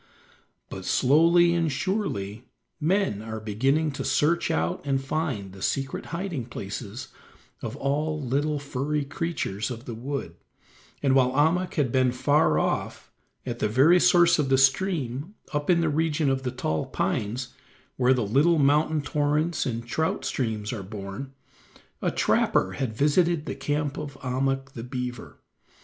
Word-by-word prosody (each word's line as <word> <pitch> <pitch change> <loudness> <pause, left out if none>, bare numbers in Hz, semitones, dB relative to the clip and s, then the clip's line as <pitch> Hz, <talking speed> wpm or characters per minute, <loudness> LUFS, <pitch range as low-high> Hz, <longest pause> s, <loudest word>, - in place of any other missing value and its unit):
But - - -7
slowly 170 +5 +4
and 165 -2 +1
surely 135 - -2 0.3
men 165 - +1
are 110 0 -5
beginning 135 +9 +1
to 135 - -5
search 170 +3 +2
out 80 +1 0
and 135 -1 0
find 135 - -3
the 95 - -12
secret 135 +4 -2
hiding 170 -7 -4
places 120 +2 -6 0.5
of - - -5
all 150 +3 -1
little 145 +3 0
furry 145 +1 -2
creatures 135 - -3
of 120 0 -7
the 120 - -5
wood, 120 -7 -5 0.7
and 135 -2 +3
while 130 -1 +4
Ahmuk 160 +6 +2
had 140 -7 +1
been 130 -1 +3
far 145 - +2
off, - - -2 0.3
at 120 -2 -4
the - - +1
very 145 +11 +5
source 175 -2 +5
of 140 -3 +1
the 135 - +4
stream 140 - +1 0.2
up 145 +2 -2
in 170 -1 +4
the 165 - +1
region 150 -1 +1
of 135 0 0
the 130 - -2
tall 100 -12 -2
pines, 120 +4 -2 0.4
where 130 +1 +3
the 120 -4 0
little 145 +11 +3
mountain 150 +1 +3
torrents 150 +3 0
and 115 -1 -3
trout 160 +6 -1
streams 110 -2 -2
are 110 - -4
born, 100 +6 -7 0.7
a - - +1
trapper 95 - +2
had 110 +3 -3
visited 155 +3 +2
the - - -3
camp 145 +1 -2
of 145 -2 -6
Ahmuk 135 0 -1
the 115 -3 -7
beaver. 125 -1 -6
135 Hz, 155 wpm, -26 LUFS, 120-155 Hz, 0.7 s, very